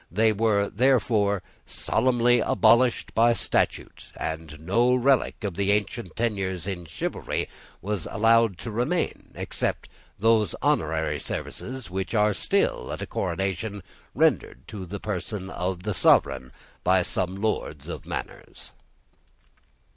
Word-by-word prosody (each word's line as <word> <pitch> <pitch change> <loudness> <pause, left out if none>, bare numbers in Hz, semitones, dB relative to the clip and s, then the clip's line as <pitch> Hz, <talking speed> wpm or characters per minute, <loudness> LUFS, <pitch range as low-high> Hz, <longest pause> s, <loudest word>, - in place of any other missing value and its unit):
They 110 +5 +3
were, 105 -1 +2
therefore, 105 -5 +2 0.2
solemnly 120 -1 +2
abolished 115 +4 +3
by 120 +1 +5
statute; - - -1
and 80 -1 -5
no 115 +10 +2
relic 130 -1 +2
of 100 -3 -2
the 100 +1 +1
ancient 105 -1 -2
tenures 95 -7 -1
in 95 -3 -4
chivalry 80 - -3 0.4
was 100 -4 -2
allowed 115 -2 +3
to 115 - -4
remain 125 +11 -1
except - - -3 0.3
those 110 -2 +3
honorary - - 0
services 130 -7 -5
which 95 +4 -3
are 105 0 +3
still, 90 - 0
at - - -4
a - - -3
coronation, 95 +2 -3 0.3
rendered 65 - +1
to 100 -4 -7
the 100 +3 -5
person 95 -1 -4
of 90 0 -3
the 105 0 -1
sovereign 65 -7 +3 0.3
by 95 0 +4
some 90 +1 -2
lords 110 +2 -2
of - - -6
manors. - - -7
105 Hz, 125 wpm, -26 LUFS, 95-115 Hz, 0.4 s, by